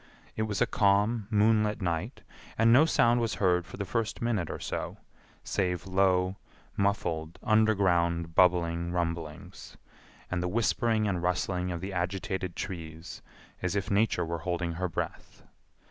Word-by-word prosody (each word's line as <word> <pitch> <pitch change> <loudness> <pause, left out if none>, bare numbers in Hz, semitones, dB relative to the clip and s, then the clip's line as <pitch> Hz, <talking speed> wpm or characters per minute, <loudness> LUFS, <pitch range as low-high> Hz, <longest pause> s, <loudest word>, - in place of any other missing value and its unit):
It - - -2
was 105 - -2
a - - +2
calm 105 +1 +2
moonlight 105 -1 +3
night, 90 +6 -3 0.3
and 115 +1 +5
no 140 +6 +7
sound 120 -6 +3
was 115 -2 -1
heard 90 -3 +1
for 95 - -10
the 100 - -3
first 110 +3 -2
minute 110 -8 -1
or - - -4
so, - - -4 0.5
save 90 -3 -1
low, 95 0 +2 0.4
muffled, 85 -5 -1
underground, 90 -7 +2
bubbling 85 -1 +2
rumblings, 85 -3 -4 0.5
and 90 -1 0
the 90 - -1
whispering 110 +1 +1
and 90 -4 -1
rustling 90 0 -1
of 85 -1 -4
the 95 +1 -5
agitated 95 0 -2
trees, 80 -2 -7 0.4
as 90 +1 -1
if 100 0 -2
Nature 100 -3 +2
were 85 0 -3
holding 85 0 -2
her 90 +2 -2
breath. - - -6
95 Hz, 145 wpm, -29 LUFS, 85-105 Hz, 0.5 s, no